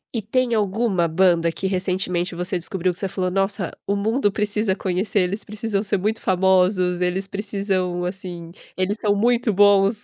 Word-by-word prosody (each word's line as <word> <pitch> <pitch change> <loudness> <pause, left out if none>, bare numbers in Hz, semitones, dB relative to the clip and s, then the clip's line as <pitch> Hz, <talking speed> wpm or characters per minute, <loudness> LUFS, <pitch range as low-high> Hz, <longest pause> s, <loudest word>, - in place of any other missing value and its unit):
E 225 - 0
tem 245 +3 0
alguma 205 -4 +1
banda 170 0 +3
que 190 - -6
recentemente 180 -1 -1
você 180 +3 -2
descobriu 180 +1 -1
que 175 - -9
você 195 - -1
falou: 185 -1 -2
"Nossa! 195 0 -1 0.2
O 200 - +1
mundo 215 +1 +1
precisa 210 -1 0
conhecer, 195 +2 0
eles 195 +4 -2
precisam 210 -1 -3
ser 200 -1 -1
muito 215 +4 -1
famosos, 185 -1 +2
eles 180 +2 -1
precisam, 195 -3 -2
assim, 180 -2 -6 0.3
eles 185 +3 0
são 205 -1 +2
muito 235 +2 +2
bons"? 205 +1 +4
195 Hz, 165 wpm, -22 LUFS, 180-205 Hz, 0.3 s, bons